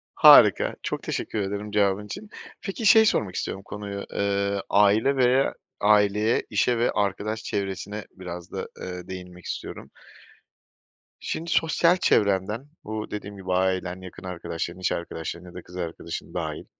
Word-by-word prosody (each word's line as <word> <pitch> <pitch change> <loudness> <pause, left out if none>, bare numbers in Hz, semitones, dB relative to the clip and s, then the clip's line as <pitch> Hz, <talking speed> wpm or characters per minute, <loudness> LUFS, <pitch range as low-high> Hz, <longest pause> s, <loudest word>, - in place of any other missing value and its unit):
Harika, - - +7
çok - - -3
teşekkür 110 - -3
ederim 100 +1 -3
cevabın 100 0 +2
için. 210 - -8 0.3
Peki, 215 +2 -4
şeyi 220 +1 +8
sormak 105 - +1
istiyorum 95 - -3
konuyu, 100 -1 -6
ııı, 100 0 0
aile 105 +7 +4
veya 130 +1 +3 0.3
aileye, 105 +1 +3
işe 115 +3 +2
ve 120 - +2
arkadaş 105 +2 -1
çevresine 100 +1 -4
biraz 90 -2 -8
da, - - -4
eee, 90 -1 -6
değinmek 90 -1 -9
istiyorum. - - -6 1.3
Şimdi 165 +1 -4
sosyal 170 +2 +3
çevrenden, 105 - +1
bu, 110 0 -5
dediğim 100 -1 -6
gibi 95 -1 -3
ailen, 95 0 0
yakın 95 +1 -11
arkadaşların, 85 -1 -5
iç 95 - 0
arkadaşların 85 +1 -5
ya - - -15
da 90 - -7
kız 90 +1 -12
arkadaşın 85 -1 -5
dâhil, - - -4
100 Hz, 145 wpm, -25 LUFS, 95-110 Hz, 1.3 s, şeyi